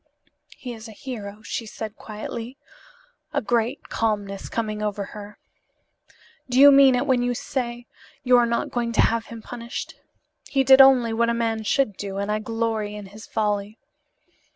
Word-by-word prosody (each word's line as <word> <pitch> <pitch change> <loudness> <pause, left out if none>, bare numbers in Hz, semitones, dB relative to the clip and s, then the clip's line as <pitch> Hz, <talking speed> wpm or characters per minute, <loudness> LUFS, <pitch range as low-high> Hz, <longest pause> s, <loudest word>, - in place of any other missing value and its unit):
"He 250 -2 -7
is 225 0 -10
a 220 - -11
hero," 215 -4 -8
she 230 0 -4
said 215 0 -7
quietly, 230 +4 -7 0.8
a 285 - +2
great 240 +1 -1
calmness 205 -3 -2
coming 215 -2 -3
over 205 -1 -2
her. 210 0 -10 1.1
"Do 250 +1 +2
you 285 +1 +10
mean 275 -2 +7
it 250 +3 0
when 260 -3 +2
you 245 0 0
say 240 -1 -4 0.4
you 250 0 +5
are 240 -1 +4
not 235 0 -1
going 235 -1 -2
to - - +4
have 230 0 +1
him 230 -1 -9
punished? 235 -1 -6 0.6
He 270 -1 +2
did 265 0 +8
only 255 -4 +6
what 235 +1 +2
a 235 - +1
man 225 -1 -1
should 215 -2 +1
do, 195 -1 -5
and 200 +1 -2
I 215 - 0
glory 220 -1 -2
in 210 -1 -8
his 215 +1 -11
folly." 210 0 -1
230 Hz, 175 wpm, -24 LUFS, 210-245 Hz, 1.1 s, you